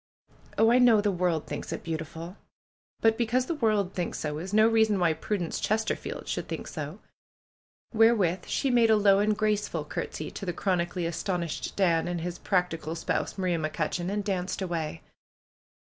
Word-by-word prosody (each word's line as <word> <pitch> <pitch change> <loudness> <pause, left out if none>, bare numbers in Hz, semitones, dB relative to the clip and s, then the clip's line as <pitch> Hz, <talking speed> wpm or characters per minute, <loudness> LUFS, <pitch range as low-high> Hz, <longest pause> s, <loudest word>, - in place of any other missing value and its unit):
'^Oh, 225 +1 +5
I 250 - +5
know 240 -4 +6
the 205 0 +1
world 175 -4 0
thinks - - -6
it - - -5
beautiful! 165 +2 -5 0.7
But 225 0 +3
be 235 - +1
cause 250 +3 +1
the 335 - -2
world 215 - +1
thinks 175 -2 -3
so 150 -1 -3
is 185 +4 -6
no 215 +1 +5
reason 220 -2 +3
why 170 -3 +3
Prudence 180 0 -3
Chesterfield 220 +1 -2
should - - -3
think - - -5
so - - -6 0.5
!" - - -42
wherewith 215 -6 +3
she 275 - 0
made 235 -2 +4
a 220 - +6
low 200 -2 +5
and 210 0 +2
graceful 210 -7 0
courtesy 155 +1 -5
to - - -8
the 180 -2 -2
chronically 175 -1 -1
astonished 170 -1 -3
Dan 170 -4 +2
and 175 -1 -2
his 175 +1 -4
practical 170 -4 -1
spouse, 165 - -2
Maria 180 -3 0
McCutcheon, 160 +3 -2
and 205 +1 -1
danced 185 -2 -2
away. 165 -4 -3
185 Hz, 180 wpm, -28 LUFS, 170-215 Hz, 0.7 s, know